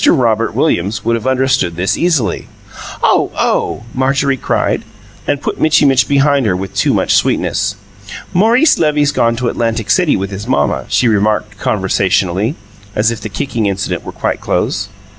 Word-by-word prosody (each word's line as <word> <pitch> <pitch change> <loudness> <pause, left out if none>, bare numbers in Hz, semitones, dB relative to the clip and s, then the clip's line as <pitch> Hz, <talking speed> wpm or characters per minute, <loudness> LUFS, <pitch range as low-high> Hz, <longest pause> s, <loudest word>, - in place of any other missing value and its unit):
Robert 115 -3 +2
Williams 100 - 0
would 115 0 +2
have 115 +2 -4
understood 130 -9 +1
this, 95 +3 0
easily. 150 - 0 0.6
"Oh, - - +3
oh!" - - 0
Marjorie 135 +1 +1
cried, - - -1 0.4
and 145 -1 -1
put - - -3
Mitchy 155 -1 +4
Mitch 135 -2 +3
behind 140 -2 +2
her 90 - +1
with 95 +1 -5
too 100 - +1
much - - +1
sweetness. - - +1 0.6
"Maurice 235 - +4
Levy's 150 -2 +2
gone 115 -5 +1
to 125 +1 -2
Atlantic 115 -2 -1
City 180 -5 +3
with 95 +1 -4
his 100 +1 -6
mamma," 70 -2 0
she 125 - +2
remarked 105 -1 0
conversationally, 95 - 0 0.4
as 110 +2 +2
if 115 -2 -6
the 110 - -5
kicking 115 -1 -2
incident 95 -1 -2
were - - -7
quite - - -3
closed. 100 -1 -1
115 Hz, 160 wpm, -14 LUFS, 100-140 Hz, 0.6 s, Mitchy